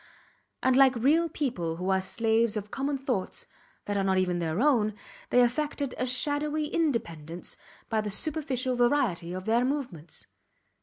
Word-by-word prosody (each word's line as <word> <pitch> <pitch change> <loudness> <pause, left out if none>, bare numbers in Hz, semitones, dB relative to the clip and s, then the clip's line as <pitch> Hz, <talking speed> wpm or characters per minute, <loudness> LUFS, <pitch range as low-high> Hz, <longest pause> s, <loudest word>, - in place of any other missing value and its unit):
And 260 0 +4
like 265 -1 +6
real 305 +8 +3
people 230 - -2
who 180 +3 -2
are 190 0 +2
slaves 225 +1 +1
of 210 0 -6
common 275 +1 -1
thoughts, 255 -8 -3 0.4
that 205 0 -2
are 195 - +1
not 190 -1 +2
even 180 -2 +1
their 165 +1 -1
own, 230 -7 +3 0.3
they 250 - +5
affected 280 +2 0
a 255 - 0
shadowy 295 +4 +1
independence 175 - -2 0.3
by 220 -1 0
the 210 - -4
superficial 265 +1 -1
variety 240 -9 +1
of 185 +1 -5
their 230 +2 +2
movements. 245 - -4
240 Hz, 155 wpm, -28 LUFS, 190-275 Hz, 0.4 s, like